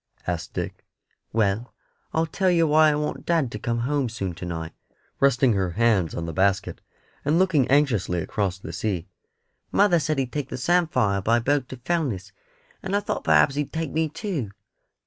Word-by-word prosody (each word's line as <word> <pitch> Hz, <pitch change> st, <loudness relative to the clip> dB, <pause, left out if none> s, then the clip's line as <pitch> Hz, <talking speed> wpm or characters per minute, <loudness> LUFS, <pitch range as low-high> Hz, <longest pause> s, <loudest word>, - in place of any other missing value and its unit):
asked 85 Hz, -2 st, -4 dB
Dick. -, -, -4 dB, 0.5 s
"Well, 110 Hz, +2 st, 0 dB, 0.4 s
I'll 160 Hz, +1 st, +1 dB
tell 185 Hz, +4 st, 0 dB
yer 170 Hz, -2 st, +4 dB
why 155 Hz, 0 st, +5 dB
I 150 Hz, -, +1 dB
want 150 Hz, 0 st, -3 dB
dad 160 Hz, -8 st, +1 dB
to 105 Hz, -, -5 dB
come 115 Hz, +2 st, -1 dB
home 135 Hz, 0 st, 0 dB
soon 100 Hz, -5 st, -4 dB
to 90 Hz, +2 st, -7 dB
night," 80 Hz, -1 st, -4 dB, 0.2 s
said -, -, -40 dB
Tiny, -, -, -40 dB
resting 130 Hz, -3 st, +4 dB
her 95 Hz, -3 st, 0 dB
hands 105 Hz, -6 st, +2 dB
on 85 Hz, -, -3 dB
the 85 Hz, -, -5 dB
basket, 95 Hz, +2 st, 0 dB, 0.4 s
and 150 Hz, +3 st, +2 dB
looking 170 Hz, -8 st, +3 dB
anxiously 125 Hz, -11 st, +2 dB
across 95 Hz, +2 st, -2 dB
the 95 Hz, -, -8 dB
sea. 95 Hz, -6 st, -2 dB, 0.7 s
"Mother 200 Hz, -4 st, +4 dB
said 155 Hz, -1 st, -1 dB
he'd 130 Hz, -2 st, -1 dB
take 145 Hz, -3 st, -3 dB
the -, -, -4 dB
samphire 130 Hz, -, +2 dB
by 115 Hz, +4 st, +3 dB
boat 135 Hz, +2 st, 0 dB
to 130 Hz, -, -7 dB
Fellness, 120 Hz, -, -2 dB, 0.5 s
and 190 Hz, +1 st, -2 dB
I -, -, +3 dB
thought -, -, -3 dB
perhaps 80 Hz, -, +5 dB
he'd 145 Hz, 0 st, -2 dB
take 160 Hz, -2 st, -3 dB
me 160 Hz, 0 st, 0 dB
too." 165 Hz, -, -4 dB
125 Hz, 190 wpm, -24 LUFS, 100-155 Hz, 0.7 s, why